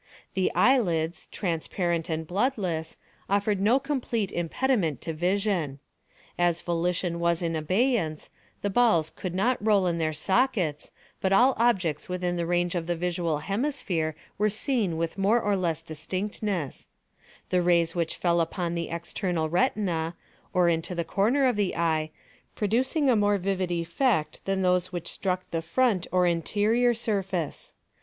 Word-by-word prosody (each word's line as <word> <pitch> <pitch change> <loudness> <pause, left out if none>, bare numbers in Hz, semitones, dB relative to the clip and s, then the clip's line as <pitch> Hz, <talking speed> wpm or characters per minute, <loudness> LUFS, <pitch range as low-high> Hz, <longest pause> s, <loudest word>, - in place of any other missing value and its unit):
The 190 -1 +1
eyelids, 175 -10 +2
transparent 170 -1 -2
and 160 0 -2
bloodless, 180 - -1 0.3
offered 200 0 +1
no 230 +7 +4
complete 250 -7 -2
impediment 175 - 0
to 165 - -4
vision. 180 -3 0 0.6
As 175 -1 +2
volition 175 0 -1
was 170 0 +1
in 165 -1 -1
abeyance, 185 - 0 0.3
the 205 - 0
balls 205 -9 +3
could 180 -2 -5
not 225 +4 +1
roll 205 -3 +4
in 170 -1 0
their 160 -1 +1
sockets 185 - 0 0.3
but 190 - +1
all 245 +7 +5
objects 185 -12 +1
within 180 -1 -1
the 170 -1 -2
range 175 +1 +1
of 170 -2 -2
the 175 - 0
visual 170 -2 -1
hemisphere 195 - -1 0.2
were 210 +1 +3
seen 215 - -1
with 165 +3 -3
more 210 +5 +4
or 205 -2 +1
less 165 -4 -1
distinctness; 185 +1 -3 0.6
the 180 -1 +3
rays 170 -1 +3
which 170 -2 -1
fell 170 -1 +2
upon 170 +1 -2
the 170 -1 -3
external 170 -1 -2
retina, 175 -1 0 0.4
or 180 -1 +3
into 170 +1 0
the 170 -1 -2
corner 240 - +2
of 250 -3 +3
the 205 -3 0
eye, 160 -2 +1 0.5
producing 260 - +1
a 255 - +5
more 205 -1 +3
vivid 190 -1 -1
effect 170 - 0
than 195 -1 0
those 180 0 +2
which 175 -2 -5
struck 185 -1 -2
the 165 - -1
front 190 +2 +1
or 180 -1 +3
interior 215 +8 +2
surface. 195 -7 -2
180 Hz, 150 wpm, -27 LUFS, 170-210 Hz, 0.6 s, all